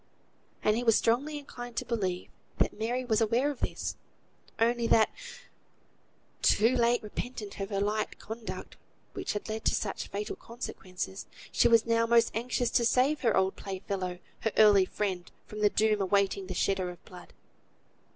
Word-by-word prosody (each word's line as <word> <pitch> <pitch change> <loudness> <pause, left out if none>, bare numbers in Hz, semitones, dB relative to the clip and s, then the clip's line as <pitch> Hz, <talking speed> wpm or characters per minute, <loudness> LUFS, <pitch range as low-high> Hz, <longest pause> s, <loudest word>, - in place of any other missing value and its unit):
And 215 - +3
he 240 - -1
was 225 -2 +5
strongly 275 +7 +1
inclined 245 -4 -8
to - - -1
believe, 190 -7 -2 0.3
that - - +2
Mary 240 +4 -2
was 225 -2 +2
aware 235 +6 +2
of 275 - -9
this, - - -3 0.6
only 235 +1 +2
that, 220 -1 +4 1.3
too 230 +5 +4
late 240 -1 +2
repentant 210 -1 -6
of 195 0 -3
her 200 -2 -1
light 210 +2 -1
conduct 220 +1 -7 0.4
which - - -3
had 205 - -4
led 220 0 -4
to - - +3
such 200 - -3
fatal 205 +1 -4
consequences, 185 - -6 0.2
she - - +4
was 230 -1 +5
now 230 0 +2
most 235 0 +4
anxious 245 +1 0
to 240 - +3
save 260 +6 +3
her 230 -5 +2
old 190 0 +2
play 195 -1 -5
fellow, 185 -2 -3 0.2
her 220 - -1
early 205 -3 +7
friend, 185 -3 -3
from 215 - -8
the 210 0 +4
doom 215 0 +2
awaiting 195 0 +1
the 185 - -5
shedder 190 0 0
of 175 - -11
blood. 180 -2 -12
220 Hz, 170 wpm, -30 LUFS, 195-235 Hz, 1.3 s, early